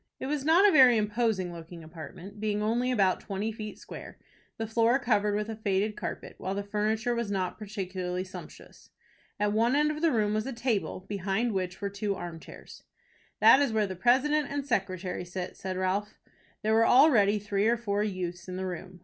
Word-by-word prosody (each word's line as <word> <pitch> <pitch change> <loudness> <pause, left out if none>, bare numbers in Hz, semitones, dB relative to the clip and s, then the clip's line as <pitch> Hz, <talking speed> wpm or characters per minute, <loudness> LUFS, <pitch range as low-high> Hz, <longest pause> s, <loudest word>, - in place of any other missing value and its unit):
It - - -4
was 285 0 -2
not 335 +7 +6
a - - +5
very 255 -7 +7
imposing 210 -4 0
looking 165 0 -10
apartment, 170 +5 -10
being 210 -1 -1
only 240 +4 +1
about 195 -6 +2
twenty 205 +2 -3
feet 215 -1 -7
square, - - -10 0.4
the 225 - -2
floor 230 +3 +3
covered 210 -5 +1
with 210 0 -1
a 225 - -5
faded 210 0 0
carpet, - - -6
while 190 +1 -3
the 200 - -2
furniture 215 +3 -1
was 235 -3 -2
not 190 -1 -2
particularly 185 -3 -4
sumptuous. 185 - -12 0.5
At 210 0 +1
one 230 +4 +2
end 300 +1 +3
of 305 0 -5
the 335 - +4
room 210 -3 +1
was 215 +3 -1
a 270 - -4
table, 230 -6 -1
behind 200 +4 -1
which 185 -2 -3
were 200 - -1
two 200 0 -2
arm 175 -3 -7
chairs. - - -13 0.6
"That 265 - +8
is 280 -4 +2
where 215 -1 +2
the 190 -1 -5
president 275 - +2
and 285 -1 -3
secretary 185 -7 -2
sit," 180 +1 -6
said 190 -1 -5
Ralph. 195 +3 -1 0.5
There 215 +1 +2
were 225 +1 +4
already 240 -7 +5
three 205 0 0
or 235 +1 +3
four 205 -3 -1
youths 180 -3 -4
in 185 - -5
the 190 0 -3
room. 185 0 -7
210 Hz, 200 wpm, -29 LUFS, 190-235 Hz, 0.6 s, That